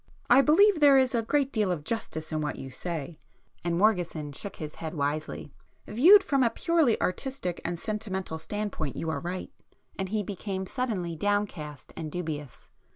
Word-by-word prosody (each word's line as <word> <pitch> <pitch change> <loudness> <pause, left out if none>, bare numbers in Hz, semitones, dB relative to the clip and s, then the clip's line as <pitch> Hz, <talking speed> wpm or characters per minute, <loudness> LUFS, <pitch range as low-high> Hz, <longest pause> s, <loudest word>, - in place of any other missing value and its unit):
"I 255 +3 +9
believe 340 +6 +5
there 285 -2 +7
is 260 0 +3
a 235 - +2
great 275 +4 0
deal 210 -4 +1
of 160 -4 -3
justice 160 -5 -4
in 155 0 -1
what 145 -3 -2
you 135 - -8
say;" 160 +1 -5 0.4
and 170 -1 0
Morgeson 175 -7 +1
shook 195 +8 -6
his 155 -1 -6
head 160 0 -4
wisely—"Viewed 160 - +2
from 275 -2 +1
a 240 - +4
purely 320 -1 +2
artistic 185 -3 -2
and 175 0 -2
sentimental 190 -5 -3
standpoint 200 -5 -4
you 160 - -2
are - - -2
right." 180 +1 -5 0.5
And 190 -1 -2
he 215 +1 0
became 190 0 -4
suddenly 190 -7 -2
downcast 180 -6 -2
and 155 -2 -5
dubious. 150 -6 -6
185 Hz, 165 wpm, -28 LUFS, 160-230 Hz, 0.5 s, I